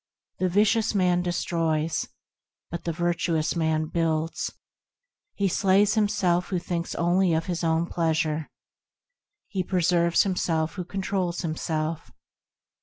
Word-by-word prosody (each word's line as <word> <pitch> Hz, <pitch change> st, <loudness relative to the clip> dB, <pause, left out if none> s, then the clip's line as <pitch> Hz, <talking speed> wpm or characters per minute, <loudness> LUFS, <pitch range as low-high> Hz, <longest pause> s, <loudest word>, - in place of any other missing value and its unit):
The 185 Hz, -, +1 dB
vicious 215 Hz, +3 st, +2 dB
man 180 Hz, -2 st, +3 dB
destroys, 165 Hz, -3 st, -1 dB, 0.6 s
but 170 Hz, -, -5 dB
the 170 Hz, -, 0 dB
virtuous 170 Hz, -1 st, 0 dB
man 160 Hz, -1 st, +1 dB
builds; 165 Hz, 0 st, -1 dB, 0.8 s
He 200 Hz, -, +1 dB
slays 195 Hz, +3 st, +3 dB
himself 205 Hz, -5 st, +1 dB
who 185 Hz, -, 0 dB
thinks 170 Hz, -1 st, -3 dB
only 175 Hz, 0 st, +2 dB
of 160 Hz, -, -1 dB
his 175 Hz, -1 st, -3 dB
own 165 Hz, 0 st, +2 dB
pleasure; 160 Hz, -2 st, -1 dB, 1.0 s
He 195 Hz, -2 st, -2 dB
preserves 175 Hz, -2 st, +2 dB
himself 165 Hz, -4 st, 0 dB
who 185 Hz, -3 st, -5 dB
controls 190 Hz, -1 st, -2 dB
himself. 160 Hz, -1 st, -3 dB
175 Hz, 115 wpm, -26 LUFS, 160-185 Hz, 1.0 s, man